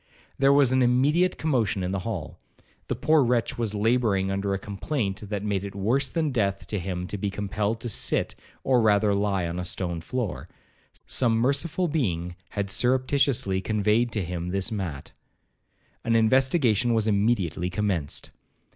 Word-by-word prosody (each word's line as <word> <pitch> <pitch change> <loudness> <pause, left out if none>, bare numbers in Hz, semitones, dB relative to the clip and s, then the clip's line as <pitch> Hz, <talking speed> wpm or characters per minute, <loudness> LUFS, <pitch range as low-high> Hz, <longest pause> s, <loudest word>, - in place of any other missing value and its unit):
There 135 0 +5
was 140 -3 +5
an 130 0 +3
immediate 140 +9 +3
commotion 115 -11 0
in 90 - -2
the 100 - -1
hall. 95 -6 -5 0.5
The - - -1
poor 155 -2 +3
wretch 120 -1 0
was 110 -3 -1
labouring 105 -3 +1
under 100 +1 -1
a 100 - 0
complaint 100 0 -4
that 105 -1 -3
made 100 -2 -1
it 100 -1 -7
worse 120 +7 +1
than 155 -1 -1
death 100 -5 -1
to 105 - -1
him 90 0 -4
to 100 +2 -5
be 100 - -1
compelled 105 +2 -2
to 120 - -4
sit 110 - -1 0.3
or 130 -2 +3
rather 105 -1 +3
lie 100 -3 0
on 85 +1 -4
a - - -2
stone 85 -1 -2
floor; 120 +2 -4 0.6
some 115 -3 +1
merciful 140 +9 +1
being 90 - -1
had 100 -1 -3
surreptitiously 130 -4 +1
conveyed 110 +3 +1
to 105 - -1
him 90 0 -4
this 95 +4 -1
mat. 90 -10 -5 0.9
An 115 0 +1
investigation 120 - +3
was 110 -1 +1
immediately 100 -5 +1
commenced. 90 -6 -2
105 Hz, 165 wpm, -26 LUFS, 95-125 Hz, 0.9 s, There